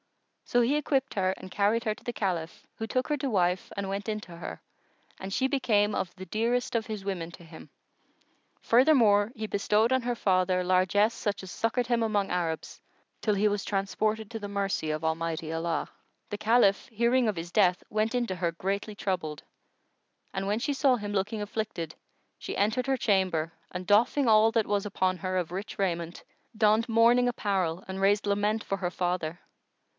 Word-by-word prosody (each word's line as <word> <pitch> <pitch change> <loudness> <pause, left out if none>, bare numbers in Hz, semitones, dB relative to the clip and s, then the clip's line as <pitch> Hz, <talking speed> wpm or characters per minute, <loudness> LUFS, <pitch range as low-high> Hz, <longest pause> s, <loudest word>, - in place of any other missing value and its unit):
So 245 - +2
he 245 +5 +2
equipped 275 -2 0
her 185 -2 +1
and 185 - -10
carried 215 +5 +1
her 215 -1 0
to - - -18
the 240 - -3
Caliph, 190 -2 -3
who 225 - -4
took 255 +3 -1
her 300 - +1
to 275 0 -2
wife 180 -4 +1
and 200 -1 -2
went 200 +3 -3
in 215 0 -1
to 175 -4 -11
her, 170 - -7 0.6
and 190 +1 -7
she 260 +6 +1
became 215 -6 +2
of 175 - -2
the 190 -1 -8
dearest 235 +4 -1
of 225 -1 0
his 210 -3 -5
women 175 -4 -3
to 170 - -12
him. 160 -1 -13 0.9
Furthermore, 230 -5 +4
he 220 -4 -5
bestowed 210 +4 +2
on 260 - +2
her 240 0 -1
father 185 -3 +2
largesse 185 +4 +3
such 205 -3 -3
as 185 - -8
succoured 235 +2 -1
him 235 -2 +1
among 205 -3 0
Arabs, 165 -3 -3 0.4
till 210 -2 +1
he 205 +2 +3
was 205 -1 -1
transported 210 +2 -1
to 225 - -4
the 205 -1 -6
mercy 195 -5 -1
of 155 +1 -2
Almighty 160 0 -2
Allah. 165 0 -1 0.4
The 205 - -2
Caliph, 220 +1 +3
hearing 235 +2 +2
of 205 - -3
his 170 +1 -5
death, 180 -3 +3
went 215 +2 0
in 245 -1 0
to 185 - -3
her 175 -1 -1
greatly 200 +5 -3
troubled; 180 -7 -3 0.9
and, 195 0 -2
when 210 +2 0
she 285 +4 -1
saw 275 -2 +3
him 205 -2 -5
looking 210 +2 -1
afflicted, 205 -6 -4 0.4
she - - -5
entered 220 +6 +1
her 270 -1 +2
chamber 185 -7 +1 0.2
and 180 0 -6
doffing 235 +6 +3
all 220 0 +6
that 225 -2 +1
was 205 -1 0
upon 185 -2 0
her 185 0 -2
of 175 -2 -2
rich 195 +4 -5
raiment, 170 -3 -2 0.3
donned 220 +2 +3
mourning 235 +2 +5
apparel 190 -6 -1
and 190 0 -5
raised 205 +1 +3
lament 205 +2 +1
for 195 - -2
her 180 -2 -2
father. 175 -2 -2
205 Hz, 190 wpm, -28 LUFS, 185-225 Hz, 0.9 s, all